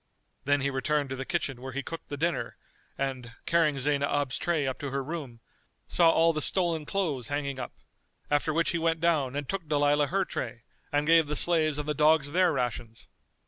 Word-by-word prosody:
Then 145 Hz, +1 st, +2 dB
he 140 Hz, +1 st, 0 dB
returned 140 Hz, +1 st, -1 dB
to -, -, -2 dB
the 135 Hz, 0 st, -5 dB
kitchen 135 Hz, -7 st, -2 dB
where 130 Hz, 0 st, -7 dB
he 140 Hz, +2 st, -3 dB
cooked 165 Hz, +5 st, -8 dB
the 145 Hz, -, -4 dB
dinner 170 Hz, +4 st, -2 dB, 0.4 s
and, 130 Hz, -4 st, -4 dB
carrying 165 Hz, -4 st, +2 dB
Zaynab's 140 Hz, 0 st, 0 dB
tray 165 Hz, -5 st, 0 dB
up 130 Hz, -1 st, -3 dB
to 140 Hz, -, -4 dB
her 135 Hz, 0 st, -2 dB
room, 135 Hz, -6 st, -6 dB, 0.5 s
saw 170 Hz, -2 st, +4 dB
all 165 Hz, 0 st, +4 dB
the 155 Hz, -, -2 dB
stolen 165 Hz, -3 st, +1 dB
clothes 155 Hz, -, -1 dB
hanging 140 Hz, -2 st, -3 dB
up; 125 Hz, -, -6 dB, 0.6 s
after 145 Hz, +2 st, +2 dB
which 165 Hz, +2 st, +1 dB
he 170 Hz, -, -1 dB
went 165 Hz, 0 st, +1 dB
down 155 Hz, -6 st, +1 dB
and 145 Hz, -1 st, -3 dB
took 185 Hz, +1 st, -4 dB
Dalilah 145 Hz, 0 st, +2 dB
her 195 Hz, +3 st, 0 dB
tray 120 Hz, -6 st, -5 dB, 0.3 s
and 145 Hz, +1 st, +1 dB
gave 165 Hz, -1 st, +5 dB
the 150 Hz, -, -2 dB
slaves 155 Hz, -2 st, +3 dB
and 150 Hz, 0 st, -3 dB
the 150 Hz, -, 0 dB
dogs 150 Hz, -1 st, +3 dB
their 180 Hz, +1 st, +3 dB
rations. 120 Hz, -4 st, -4 dB
145 Hz, 200 wpm, -28 LUFS, 135-165 Hz, 0.6 s, gave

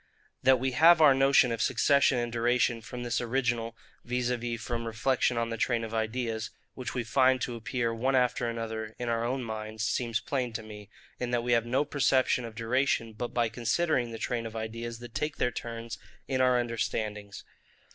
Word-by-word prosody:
That 130 Hz, -1 st, +5 dB
we 130 Hz, +1 st, 0 dB
have 165 Hz, +6 st, +6 dB
our 150 Hz, -3 st, +7 dB
notion 135 Hz, -2 st, +4 dB
of 115 Hz, -1 st, -2 dB
succession 135 Hz, +2 st, +3 dB
and 120 Hz, -1 st, -2 dB
duration 120 Hz, 0 st, +1 dB
from 120 Hz, +2 st, -7 dB
this 120 Hz, 0 st, -1 dB
original, 120 Hz, -2 st, -1 dB, 0.3 s
viz. 125 Hz, 0 st, -1 dB, 0.3 s
from 115 Hz, +1 st, -4 dB
reflection 120 Hz, +2 st, +1 dB
on 115 Hz, 0 st, -1 dB
the 115 Hz, -, -3 dB
train 115 Hz, +1 st, 0 dB
of 110 Hz, 0 st, -6 dB
ideas, 115 Hz, 0 st, -2 dB, 0.2 s
which 130 Hz, +2 st, -6 dB
we 125 Hz, -, -1 dB
find 130 Hz, +2 st, +3 dB
to 120 Hz, -, -2 dB
appear 115 Hz, 0 st, -2 dB
one 130 Hz, +4 st, 0 dB
after 125 Hz, -2 st, +1 dB
another 110 Hz, -1 st, -5 dB
in 120 Hz, -1 st, -3 dB
our 115 Hz, 0 st, 0 dB
own 130 Hz, +2 st, -1 dB
minds, 110 Hz, -1 st, -5 dB
seems 115 Hz, -1 st, 0 dB
plain 125 Hz, -4 st, -2 dB
to 110 Hz, 0 st, -4 dB
me, 105 Hz, -2 st, -11 dB, 0.3 s
in 125 Hz, -, -2 dB
that 120 Hz, -1 st, 0 dB
we 120 Hz, -, -1 dB
have 115 Hz, -1 st, +3 dB
no 135 Hz, +5 st, +1 dB
perception 130 Hz, -3 st, +2 dB
of 115 Hz, -1 st, -9 dB
duration 115 Hz, 0 st, 0 dB
but 120 Hz, +3 st, -5 dB
by 120 Hz, -1 st, +1 dB
considering 120 Hz, +4 st, 0 dB
the 115 Hz, -, -6 dB
train 115 Hz, 0 st, -2 dB
of 110 Hz, -, -10 dB
ideas 115 Hz, +1 st, -5 dB
that 120 Hz, -1 st, -11 dB
take 150 Hz, +4 st, -2 dB
their 125 Hz, -, +1 dB
turns 115 Hz, 0 st, -6 dB, 0.3 s
in 130 Hz, -1 st, 0 dB
our 125 Hz, -1 st, +4 dB
understandings. 110 Hz, -3 st, -3 dB
120 Hz, 195 wpm, -29 LUFS, 115-125 Hz, 0.3 s, our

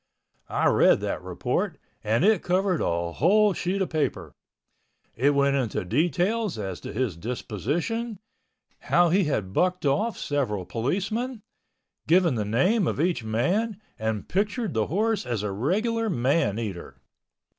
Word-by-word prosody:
I -, -, 0 dB
read -, -, +5 dB
that -, -, -3 dB
report -, -, -2 dB, 0.3 s
and 115 Hz, -, +2 dB
it 215 Hz, -4 st, +4 dB
covered 185 Hz, -1 st, +1 dB
a 85 Hz, 0 st, -1 dB
whole 205 Hz, -, +3 dB
sheet 190 Hz, +2 st, -1 dB
of -, -, -6 dB
paper. 155 Hz, -2 st, -1 dB, 0.8 s
It 140 Hz, +5 st, +2 dB
went 140 Hz, 0 st, +3 dB
into 120 Hz, -8 st, -1 dB
details 175 Hz, -, 0 dB
as 95 Hz, -4 st, -4 dB
to -, -, -7 dB
his 120 Hz, -6 st, -1 dB
disposition, 145 Hz, -, -3 dB, 0.7 s
how 175 Hz, 0 st, +5 dB
he 190 Hz, +2 st, +3 dB
had 105 Hz, -10 st, -2 dB
bucked 180 Hz, -, +1 dB
off 150 Hz, +12 st, +1 dB
several 120 Hz, -10 st, -2 dB
policemen, 205 Hz, -, -2 dB, 0.6 s
giving 170 Hz, -2 st, +4 dB
the 110 Hz, -3 st, -1 dB
name 180 Hz, -, +2 dB
of -, -, -2 dB
each 170 Hz, -6 st, +1 dB
man, 185 Hz, -, 0 dB, 0.2 s
and 110 Hz, -1 st, -2 dB
pictured 210 Hz, -, -1 dB
the 110 Hz, -2 st, 0 dB
horse 215 Hz, +6 st, 0 dB
as 120 Hz, -4 st, -3 dB
a 105 Hz, -, -2 dB
regular 215 Hz, -, 0 dB
man 135 Hz, -, +1 dB
eater. 100 Hz, -7 st, -5 dB
155 Hz, 145 wpm, -26 LUFS, -, 0.8 s, read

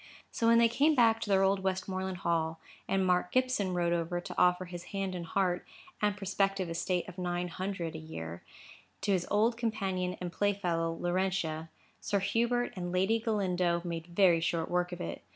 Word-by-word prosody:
So 230 Hz, -, 0 dB
when 230 Hz, 0 st, +6 dB
they 230 Hz, 0 st, +6 dB
came 290 Hz, +7 st, +3 dB
back 225 Hz, -3 st, +4 dB
to 210 Hz, -, -4 dB
their 195 Hz, -1 st, +4 dB
old 195 Hz, 0 st, +3 dB
Westmoreland 190 Hz, 0 st, -2 dB
Hall, 165 Hz, -1 st, 0 dB, 0.3 s
and 195 Hz, -1 st, +1 dB
Mark 180 Hz, -1 st, +2 dB
Gibson 255 Hz, -8 st, +1 dB
rode 175 Hz, -1 st, +1 dB
over 170 Hz, +1 st, -1 dB
to 175 Hz, -, -7 dB
offer 180 Hz, 0 st, +3 dB
his 175 Hz, 0 st, -8 dB
hand 195 Hz, -1 st, -3 dB
and 175 Hz, -2 st, -4 dB
his -, -, -12 dB
heart, 185 Hz, -3 st, +1 dB, 0.4 s
and 210 Hz, -1 st, +1 dB
prospective 195 Hz, -2 st, 0 dB
estate 175 Hz, +2 st, -1 dB
of 180 Hz, 0 st, -9 dB
nine 175 Hz, 0 st, -2 dB
hundred 185 Hz, -2 st, -4 dB
a 160 Hz, -, -6 dB
year, 85 Hz, -, -7 dB, 0.6 s
to 205 Hz, -, 0 dB
his 185 Hz, -3 st, +1 dB
old 225 Hz, +3 st, +2 dB
companion 190 Hz, -6 st, -1 dB
and 180 Hz, -1 st, -4 dB
playfellow, 180 Hz, -5 st, 0 dB
Laurentia, 175 Hz, -3 st, -1 dB, 0.3 s
Sir 200 Hz, -, 0 dB
Hubert 235 Hz, +5 st, 0 dB
and 175 Hz, -1 st, -4 dB
Lady 190 Hz, +5 st, +2 dB
Galindo 185 Hz, -6 st, 0 dB
made 165 Hz, -1 st, -4 dB
very 175 Hz, -1 st, +4 dB
short 165 Hz, 0 st, -1 dB
work 180 Hz, 0 st, +1 dB
of 175 Hz, -, -6 dB
it. 85 Hz, -, -5 dB
185 Hz, 190 wpm, -31 LUFS, 175-200 Hz, 0.6 s, when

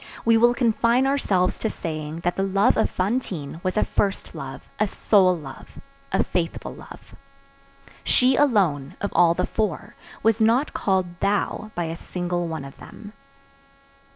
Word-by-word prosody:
We 230 Hz, 0 st, +5 dB
will 240 Hz, +2 st, +4 dB
confine 235 Hz, +1 st, +2 dB
ourselves 205 Hz, -10 st, +1 dB
to 220 Hz, -, -1 dB
saying 155 Hz, -2 st, -5 dB
that 175 Hz, +1 st, -1 dB
the -, -, -1 dB
love 195 Hz, +1 st, +3 dB
of -, -, +2 dB
Fantine 185 Hz, -, -3 dB
was 185 Hz, +2 st, -1 dB
a -, -, +3 dB
first 195 Hz, -1 st, -1 dB
love, 135 Hz, -4 st, -8 dB
a 215 Hz, -, +2 dB
sole 185 Hz, -2 st, +3 dB
love, 135 Hz, -4 st, -11 dB, 0.3 s
a -, -, +2 dB
faithful 165 Hz, -2 st, -3 dB
love. -, -, -13 dB, 0.9 s
She 255 Hz, +1 st, +3 dB
alone, 185 Hz, -, +2 dB
of 200 Hz, -, -3 dB
all 170 Hz, -1 st, +4 dB
the 180 Hz, -, 0 dB
four, 210 Hz, -8 st, -3 dB, 0.3 s
was 225 Hz, +1 st, +2 dB
not 235 Hz, +6 st, +3 dB
called 185 Hz, -3 st, -1 dB
"thou" 205 Hz, +1 st, -1 dB
by 175 Hz, -, -1 dB
a 165 Hz, 0 st, -4 dB
single 175 Hz, 0 st, -3 dB
one 160 Hz, -4 st, -5 dB
of 135 Hz, -, -12 dB
them. 210 Hz, -1 st, -12 dB
190 Hz, 155 wpm, -23 LUFS, 170-220 Hz, 0.9 s, We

